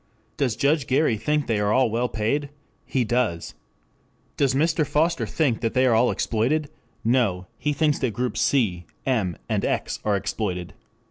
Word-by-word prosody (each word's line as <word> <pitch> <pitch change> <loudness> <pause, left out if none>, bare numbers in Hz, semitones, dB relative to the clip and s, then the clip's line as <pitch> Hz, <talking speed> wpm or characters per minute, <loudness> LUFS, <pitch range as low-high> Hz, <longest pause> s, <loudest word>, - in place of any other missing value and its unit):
Does 135 -8 0
Judge 140 0 +1
Gary 130 -2 +2
think 150 +7 0
they 110 -3 0
are 105 0 +1
all 130 -1 +3
well 120 +2 0
paid? 140 +7 -1 0.4
He 130 - +1
does. 115 -7 -1 0.8
Does 135 -2 +1
Mr. 160 +2 +2
Foster 160 +4 +1
think 140 -8 0
they 125 +3 +2
are 125 - +4
all 115 +2 +4
exploited? 140 +7 0 0.3
No, 110 -7 +1
he 150 - 0
thinks 150 0 +1
that 130 - 0
groups 125 +4 -2
C, 95 -11 +1 0.2
M, 105 -10 0
and - - -1
X - - -1
are 105 -1 +1
exploited. 90 -3 -3
125 Hz, 160 wpm, -24 LUFS, 110-145 Hz, 0.8 s, are